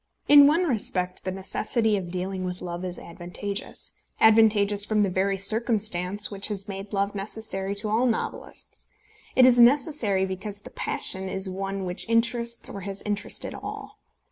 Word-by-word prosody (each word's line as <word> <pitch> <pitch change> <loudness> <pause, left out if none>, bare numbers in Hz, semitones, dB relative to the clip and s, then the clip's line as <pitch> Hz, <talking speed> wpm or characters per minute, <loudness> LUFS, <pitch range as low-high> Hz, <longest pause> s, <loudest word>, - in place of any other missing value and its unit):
In 285 -1 +9
one 325 +5 +3
respect 185 - -1
the 185 - -1
necessity 210 +3 0
of 185 -3 -4
dealing 185 +1 -4
with 180 0 -5
love 175 0 -5
is 180 -1 -5
advantageous, 180 +4 -6 0.3
advantageous 210 -2 +5
from 210 0 +1
the 195 - 0
very 195 +2 0
circumstance 205 -2 +2
which 200 -1 +2
has 205 -1 -4
made 195 0 -7
love 200 0 -1
necessary 200 -1 -4
to 210 +2 -3
all 225 +4 +2
novelists. 230 - -4 0.5
It 255 - +7
is 245 -1 +5
necessary 240 -6 +3
because 195 +2 -5
the - - -12
passion 190 0 -1
is 190 +1 -1
one 195 +1 -4
which 180 +4 -4
interests 235 0 +1
or 200 - -7
has 195 +1 -5
interested 205 -1 -2
all. - - -8
200 Hz, 160 wpm, -25 LUFS, 190-220 Hz, 0.5 s, In